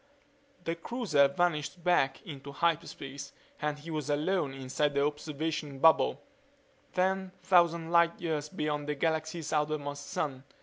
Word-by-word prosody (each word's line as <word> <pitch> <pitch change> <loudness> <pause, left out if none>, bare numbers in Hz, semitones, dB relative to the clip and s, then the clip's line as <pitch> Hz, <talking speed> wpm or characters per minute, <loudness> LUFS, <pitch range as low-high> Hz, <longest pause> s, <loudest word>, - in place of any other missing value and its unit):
The 165 - -1
cruiser 170 - +2
vanished 170 +1 -1
back 175 -6 +2
into 140 -3 -8
hyperspace 150 -3 -2 0.3
and 150 -1 -1
he 160 +3 -9
was 150 -2 -3
alone 150 +1 +1
inside 135 +2 -1
the 140 0 +3
observation 150 0 -3
bubble, 160 +4 +5 0.7
ten 190 0 0
thousand 170 -3 +3
light 170 0 +4
years 155 -3 -2
beyond 150 -1 -2
the 150 - 0
galaxy's 160 +1 -1
outermost 145 -1 -1
sun. 145 -8 -3
155 Hz, 130 wpm, -31 LUFS, 145-170 Hz, 0.7 s, bubble